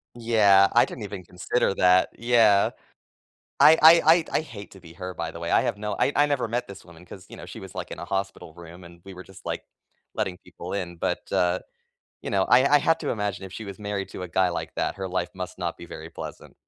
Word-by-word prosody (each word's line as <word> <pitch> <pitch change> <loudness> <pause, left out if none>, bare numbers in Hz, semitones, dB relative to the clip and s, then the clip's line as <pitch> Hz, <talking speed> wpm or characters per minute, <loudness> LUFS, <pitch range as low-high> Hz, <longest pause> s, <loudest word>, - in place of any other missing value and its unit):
Yeah, 105 -4 +4
I 120 - +5
didn't 115 - -9
even 100 -2 -7
consider 90 +5 -1
that, 90 0 +4
yeah. 115 -4 +4 0.9
I 160 +2 +8
I 165 +2 +8 0.2
I 165 - -3
I'd 155 - 0
hate 105 -7 -11
to 95 - -14
be 85 -2 -14
her, 90 0 -7
by 85 - -5
the 85 - -10
way, 85 0 -4
I - - +4
have 100 - -2
no 105 -1 -4
I 140 - +2
I 145 - +4
never 140 -5 -1
met 120 +2 -3
this 100 -1 -12
woman 85 0 -15
'cause, 95 +1 -12
you - - -11
know, - - -10
she - - -9
was, - - -11
like, - - -6
in - - -7
a 85 - -6
hospital 95 -4 -4
room, 85 +1 -13
and 85 0 -15
we 95 -1 -11
were 95 - -10
just, 95 -1 -16
like, - - -4 0.5
letting 95 -5 -3
people 90 +3 -9
in, 90 -3 -4
but, - - -3
uh, 90 +1 +1 0.6
you - - -6
know, 95 -1 +2
I 125 +5 +5
I - - +5
have 165 +3 +2
to - - -3
imagine 105 -3 -3
if 95 - -10
she 110 - -7
was 100 -1 -9
married 100 -2 -4
to - - -8
a 90 - -6
guy 95 +1 +2
like 85 - -5
that, - - -2
her 95 -1 -5
life 90 -1 -2
must 90 -1 -7
not 85 -2 -3
be 85 - -11
very 80 0 -9
pleasant. - - -9
95 Hz, 250 wpm, -25 LUFS, 90-110 Hz, 0.9 s, I